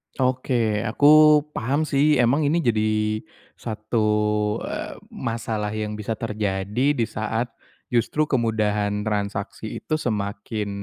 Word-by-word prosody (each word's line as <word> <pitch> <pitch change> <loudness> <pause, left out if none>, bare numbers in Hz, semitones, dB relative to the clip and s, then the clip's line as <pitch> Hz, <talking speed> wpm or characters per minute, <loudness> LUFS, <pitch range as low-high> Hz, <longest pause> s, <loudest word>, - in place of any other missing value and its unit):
Oke, 125 -4 +1
aku 120 +6 0 0.5
paham 140 +6 -1
sih. 150 0 +3
Emang 140 +6 +3
ini 170 +3 +2
jadi 110 -1 +1 0.4
satu, 110 0 -2 0.6
eee, - - -5 0.2
masalah 110 -3 -3
yang 105 0 -3
bisa 110 +2 -2
terjadi 105 +4 -1
di 120 - +1
saat 110 +3 -2 0.4
justru 120 +6 +1
kemudahan 105 -4 0
transaksi 105 0 -3
itu 155 0 -1
semakin 105 -1 -3
110 Hz, 110 wpm, -23 LUFS, 105-125 Hz, 0.6 s, sih